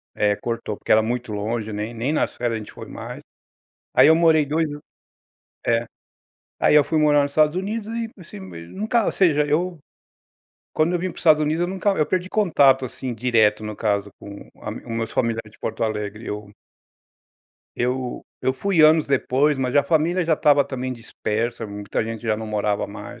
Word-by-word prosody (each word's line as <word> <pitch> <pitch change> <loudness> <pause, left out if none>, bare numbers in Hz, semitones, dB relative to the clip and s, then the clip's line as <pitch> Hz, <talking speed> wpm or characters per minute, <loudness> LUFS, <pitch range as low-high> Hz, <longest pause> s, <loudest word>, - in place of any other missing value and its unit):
eh, 105 -1 +2
cortou, 115 -2 -4
porque - - -4
era 110 - +6
muito 120 +1 -3
longe, 110 +1 -3
né, 105 +1 -3
e - - -10
nem 120 +5 -2
nas - - 0
férias 120 -2 -1
a - - -3
gente 105 - -11
foi - - -9
mais. - - -8 0.7
Aí - - +7
eu 160 - +7
morei 160 -2 +4
2 160 +2 0
an 145 0 -7 0.9
é. 115 0 +2 0.7
Aí - - +4
eu 150 - +7
fui 160 - -1
morar 145 -1 +4
nos 140 - -3
Estados 155 +2 +3
Unidos 205 +3 -3
e, 230 -1 -3
assim, 170 - -11
mei 90 -3 -9
nunca, 220 - 0
ou - - +1
seja 150 -6 +3
eu, 170 +3 -1 0.9
quando 160 +3 +1
eu - - +1
vim 185 +2 -2
para - - -14
os - - -8
Estados 155 -2 +5
Unidos 155 +2 0
eu - - +1
nunca 190 +2 0
eu 155 -6 +1
perdi 185 0 -1
contato, 140 -10 +4
assim, 125 0 -6
direto, 110 -3 +2
no 105 -1 -5
caso, 100 -2 -1
com 100 0 -11
a - - -5
os - - -7
meus 115 -1 -4
familiares 115 -3 -1
de - - -21
Porto - - -2
Alegre, 105 0 -4
eu 105 0 -6 1.3
eu 125 +1 -2 0.2
eu 130 - +1
fui 170 +4 +2
anos 155 0 +6
depois, 140 +2 +2
mas 125 -1 -1
a 145 - +5
família 165 +4 +1
já 165 -1 +3
estava 145 -1 +4
também 130 -2 -4
dispersa, 115 -1 -3
muita 100 +1 -3
gente 115 0 -6
já 110 -2 0
não 110 +1 -6
morava 105 -1 -1
mais. - - -10
130 Hz, 200 wpm, -22 LUFS, 110-155 Hz, 1.3 s, Aí